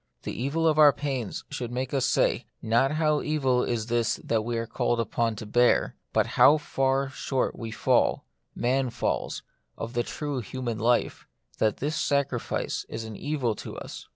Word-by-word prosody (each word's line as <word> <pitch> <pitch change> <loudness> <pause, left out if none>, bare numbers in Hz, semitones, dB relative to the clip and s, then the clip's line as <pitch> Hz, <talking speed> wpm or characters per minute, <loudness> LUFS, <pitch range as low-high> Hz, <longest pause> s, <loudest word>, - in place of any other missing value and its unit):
The - - -4
evil 150 +7 0
of 155 -1 +3
our 150 -1 +9
pains 135 -7 -3
should 120 -2 -4
make 130 +2 -3
us 135 -2 +2
say, - - +1
not 120 +5 +2
how 155 -1 +2
evil 135 -5 +1
is 115 -3 -1
this 120 -1 +1
that 110 -2 0
we 120 +1 -2
are 115 - -2
called 120 +1 0
upon 115 0 0
to 110 - -7
bear, 120 +3 +3 0.2
but - - +3
how 150 - +6
far 135 -2 0
short 135 0 -1
we 115 - -6
fall 110 - +2 0.2
— - - -48
man 130 0 +2
falls - - -2 0.2
— - - -47
of 115 +1 -5
the 120 - +1
true 145 +2 -3
human 120 0 -4
life, 120 +2 +1 0.3
that 110 -1 +2
this 150 +3 -2
sacrifice 140 -4 -1
is 110 - -5
an 110 -1 -7
evil 135 -3 -1
to - - -7
us. - - -8
125 Hz, 185 wpm, -27 LUFS, 115-140 Hz, 0.3 s, our